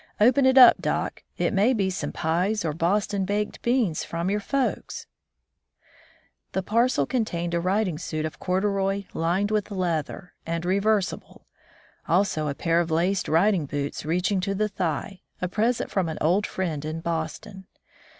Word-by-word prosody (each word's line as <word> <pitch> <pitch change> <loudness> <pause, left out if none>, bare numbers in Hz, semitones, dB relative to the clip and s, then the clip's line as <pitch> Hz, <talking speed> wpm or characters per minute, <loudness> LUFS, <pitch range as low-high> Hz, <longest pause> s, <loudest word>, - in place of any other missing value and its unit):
Open 260 +5 +5
it 260 0 +4
up, 250 -2 +9
doc; - - -2 0.2
it - - 0
may 210 +6 +3
be 195 -3 0
some 190 - -3
pies 180 +5 0
or 155 - -1
Boston 195 +4 0
baked 205 +2 -2
beans 235 -10 +1
from 170 +3 -2
your 210 - +1
folks 270 +5 -2 0.7
1" - - -41 0.7
The 190 - -1
parcel 230 - +2
contained 175 - -2
a 170 - +1
riding 185 -2 0
suit 155 -3 -3
of 155 - -6
corduroy 195 +1 0
lined 180 +5 0
with 210 -1 0
leather, 180 -2 -3
and 165 +1 -3
reversible, 200 +1 -1 0.6
also 170 -3 +1
a 140 - -2
pair 165 +2 +1
of 170 -1 -1
laced 175 +4 +1
riding 170 -1 +3
boots 145 0 -4
reaching 180 +5 0
to 195 +2 -2
the 215 +2 0
thigh, 185 0 -3 0.2
a 180 - -1
present 225 +6 0
from 185 -4 0
an 160 - -5
old 185 +7 +2
friend 165 -6 -3
in 155 +1 -4
Boston. 170 +4 -5
190 Hz, 160 wpm, -25 LUFS, 165-210 Hz, 0.7 s, up